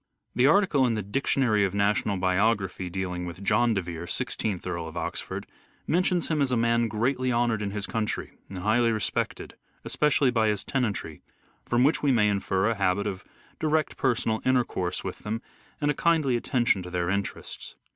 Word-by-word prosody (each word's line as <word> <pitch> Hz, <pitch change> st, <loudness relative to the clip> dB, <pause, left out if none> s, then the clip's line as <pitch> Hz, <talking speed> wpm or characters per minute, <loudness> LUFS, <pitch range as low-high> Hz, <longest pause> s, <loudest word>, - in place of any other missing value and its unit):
The 125 Hz, +2 st, +4 dB
article 155 Hz, -6 st, +4 dB
in 115 Hz, -, 0 dB
the 105 Hz, -, -2 dB
Dictionary 110 Hz, 0 st, +1 dB
of 95 Hz, 0 st, 0 dB
National 100 Hz, 0 st, +1 dB
Biography 95 Hz, 0 st, +1 dB
dealing 90 Hz, -1 st, -3 dB
with 85 Hz, +3 st, -8 dB
John 120 Hz, +3 st, +3 dB
de 95 Hz, -, 0 dB
Vere, 85 Hz, 0 st, -6 dB
Sixteenth 100 Hz, -1 st, -2 dB
Earl 85 Hz, -2 st, -3 dB
of 80 Hz, +1 st, -8 dB
Oxford, -, -, -4 dB, 0.4 s
mentions 180 Hz, 0 st, +1 dB
him 155 Hz, -2 st, 0 dB
as 135 Hz, -2 st, +1 dB
a 125 Hz, -, +2 dB
man 115 Hz, 0 st, +2 dB
greatly 125 Hz, +4 st, 0 dB
honoured 120 Hz, -2 st, +1 dB
in 100 Hz, -, -2 dB
his 100 Hz, 0 st, -3 dB
county 110 Hz, +1 st, -3 dB, 0.2 s
and 95 Hz, -, -7 dB
highly 115 Hz, +5 st, +2 dB
respected, 110 Hz, -4 st, -2 dB, 0.3 s
especially 145 Hz, -3 st, +2 dB
by 110 Hz, -2 st, +2 dB
his 105 Hz, -2 st, 0 dB
tenantry; 105 Hz, -, -2 dB, 0.5 s
from 120 Hz, +1 st, +3 dB
which 145 Hz, +4 st, +3 dB
we 145 Hz, -, +3 dB
may 105 Hz, -4 st, +4 dB
infer 100 Hz, 0 st, 0 dB
a 115 Hz, -, +2 dB
habit 100 Hz, -1 st, 0 dB
of 95 Hz, -3 st, -4 dB, 0.4 s
direct 155 Hz, 0 st, +1 dB
personal 115 Hz, -4 st, 0 dB
intercourse 120 Hz, -8 st, 0 dB
with 95 Hz, -, -5 dB
them 110 Hz, +2 st, -3 dB, 0.4 s
and 145 Hz, 0 st, +2 dB
a -, -, 0 dB
kindly 155 Hz, -5 st, +2 dB
attention 120 Hz, -4 st, +1 dB
to 90 Hz, -, -8 dB
their 90 Hz, -1 st, -1 dB
interests. 100 Hz, +2 st, -4 dB
110 Hz, 180 wpm, -27 LUFS, 95-125 Hz, 0.5 s, The